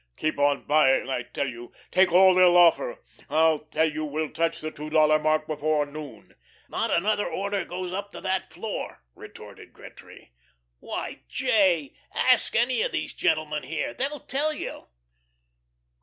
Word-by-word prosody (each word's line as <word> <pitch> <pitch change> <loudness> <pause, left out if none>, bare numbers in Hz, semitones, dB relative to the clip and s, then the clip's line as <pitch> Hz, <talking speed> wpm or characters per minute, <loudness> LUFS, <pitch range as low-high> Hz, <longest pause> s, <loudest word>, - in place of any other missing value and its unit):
Keep 155 -2 -2
on 145 0 +2
buying, 135 -3 +3
I 125 -1 -1
tell 140 +3 -4
you. 120 -1 -8 0.2
Take 185 -1 +4
all 185 +2 +7
they'll 180 -1 +5
offer. - - +3 0.3
I 160 -1 +3
tell 160 - +2
you 155 0 -4
we'll 155 +1 -3
touch 165 0 -1
the 155 -1 -5
two 150 0 -8
dollar 155 0 +4
mark 155 0 +1
before 155 -1 0
noon." 145 0 -10 0.3
"Not - - -2
another 205 +4 +1
order 200 0 -2
goes 180 0 -5
up 200 +1 -5
to - - -8
that 190 -3 -2
floor," 200 +6 -6
retorted - - -13
Gretry. - - -15 0.5
"Why, - - -6
J., 175 - +1 0.2
ask 255 -2 +2
any 245 - +2
of - - 0
these - - -3
gentlemen 155 -1 0
here. 160 0 -4
They'll 280 +2 -3
tell 295 +4 -1
you." 305 - -7
160 Hz, 155 wpm, -25 LUFS, 155-195 Hz, 0.5 s, all